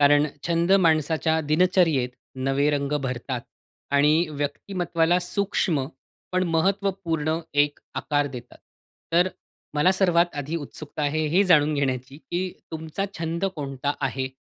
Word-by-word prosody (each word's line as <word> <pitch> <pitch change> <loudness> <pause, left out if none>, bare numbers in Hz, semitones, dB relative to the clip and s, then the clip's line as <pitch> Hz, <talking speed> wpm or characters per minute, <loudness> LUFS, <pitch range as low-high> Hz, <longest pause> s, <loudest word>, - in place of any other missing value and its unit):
कारण 145 +1 +5 0.2
छंद 170 +2 +2
माणसाच्या 160 +1 +2
दिनचर्यत 160 -3 +3 0.4
नवे 140 +2 +2
रंग 140 -1 -1
भरतात 125 -1 -3 0.5
आणि 150 +4 +4
व्यक्तिमत्त्वाला 165 +3 0
सूक्ष्म, 180 -6 0 0.5
पण 185 0 +2
महत्त्वपूर्ण 170 -4 0 0.3
एक 145 0 -7 0.2
आकार 145 -1 0
देतात. 125 -3 -9 0.5
तर 175 +2 +4 0.5
मला 150 +6 +4
सर्वात 175 -3 +2
आधी 150 +4 -3
उत्सुकता 150 0 -6
आहे 155 +2 0
हे 200 - +7
जाणून 155 -4 +4
घेण्याची, 135 -1 -2
की 180 +4 -4 0.2
तुमचा 160 +4 -3
छंद 165 +3 -2
कोणता 140 -1 -2
आहे? 135 -1 -1
155 Hz, 120 wpm, -25 LUFS, 145-175 Hz, 0.5 s, हे